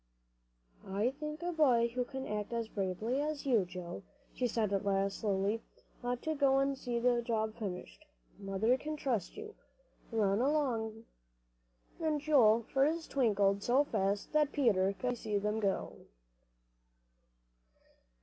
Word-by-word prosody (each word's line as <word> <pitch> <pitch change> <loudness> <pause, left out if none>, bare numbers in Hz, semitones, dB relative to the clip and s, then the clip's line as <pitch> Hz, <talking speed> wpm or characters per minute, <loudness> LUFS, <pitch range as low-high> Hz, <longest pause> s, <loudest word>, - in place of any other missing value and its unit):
"I 205 +6 0
think 300 +2 -5
a 350 - -1
boy 255 -8 +4
who 250 +1 -2
can 265 0 -6
act 210 0 -3
as 230 -1 -1
bravely 215 +6 -2
as 300 -1 -3
you 250 -5 +4
have, 185 - -2
Joe," 175 0 -7 0.3
she 250 - 0
said 215 -3 0
at 195 - 0
last, 195 0 0
slowly, 205 +1 0 0.4
"ought 245 0 -2
to 315 - 0
go 275 -2 +3
and 275 0 +2
see 245 -2 -3
the 240 0 +2
job 220 -2 -1
finished. 210 +8 -7 0.3
Mother 205 +6 +1
can 305 +1 -4
trust 250 - -2
you. 430 0 -8 0.6
Run 210 -1 +2
along," 235 -6 0 0.9
and 310 -2 0
Joel's 235 -7 +4
feet 305 +5 +1
twinkled 205 -6 +2
so 255 +6 +3
fast 200 -5 -1
that 300 -1 +3
Peter 200 -10 +3
could - - -22
hardly 245 -1 0
see 215 -2 -2
them 210 +2 -1
go. 200 -3 -1
235 Hz, 150 wpm, -33 LUFS, 205-275 Hz, 0.9 s, boy